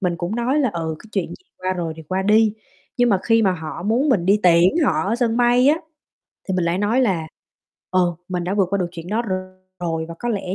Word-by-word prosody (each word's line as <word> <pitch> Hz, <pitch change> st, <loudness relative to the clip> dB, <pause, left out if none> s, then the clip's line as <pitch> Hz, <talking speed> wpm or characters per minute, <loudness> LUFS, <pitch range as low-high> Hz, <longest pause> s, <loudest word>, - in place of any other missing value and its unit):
mình 180 Hz, -3 st, -1 dB
cũng 175 Hz, +6 st, -3 dB
nói 250 Hz, +5 st, +1 dB
là 255 Hz, -6 st, +1 dB
"Ừ 160 Hz, -2 st, -3 dB
cái -, -, -15 dB
chuyện 195 Hz, -4 st, -1 dB
gì 370 Hz, -, -12 dB
qua 185 Hz, 0 st, -1 dB
rồi 170 Hz, -3 st, -3 dB
thì 160 Hz, -, -9 dB
qua 185 Hz, +5 st, -2 dB
đi." 215 Hz, +2 st, +4 dB, 0.4 s
Nhưng 245 Hz, 0 st, +3 dB
mà 195 Hz, -4 st, +3 dB
khi 225 Hz, -1 st, +3 dB
mà 190 Hz, -, +3 dB
họ 160 Hz, -1 st, -6 dB
muốn 235 Hz, +8 st, +1 dB
mình 190 Hz, -10 st, +2 dB
đi 205 Hz, +2 st, +4 dB
tiễn 180 Hz, -, +4 dB
họ -, -, +1 dB
ở 210 Hz, +4 st, 0 dB
sân 235 Hz, -2 st, 0 dB
bay 245 Hz, +2 st, +4 dB
á, 305 Hz, -, +4 dB, 0.7 s
thì 190 Hz, -, 0 dB
mình 180 Hz, -, 0 dB
lại 170 Hz, +2 st, 0 dB
nói 215 Hz, +5 st, +2 dB
là 185 Hz, -10 st, +1 dB, 0.6 s
"Ờ, 180 Hz, -2 st, +1 dB
mình 180 Hz, -1 st, -2 dB
đã 190 Hz, +3 st, -1 dB
vượt 195 Hz, -3 st, +2 dB
qua 200 Hz, -, +1 dB
được 180 Hz, -, 0 dB
chuyện 170 Hz, -1 st, -8 dB
đó 220 Hz, +4 st, 0 dB
r 220 Hz, -, -7 dB, 0.5 s
rồi", 165 Hz, -2 st, -2 dB
và 170 Hz, -, -7 dB
có 240 Hz, -, -3 dB
lẽ 195 Hz, -4 st, -2 dB
190 Hz, 255 wpm, -21 LUFS, 175-230 Hz, 0.7 s, đi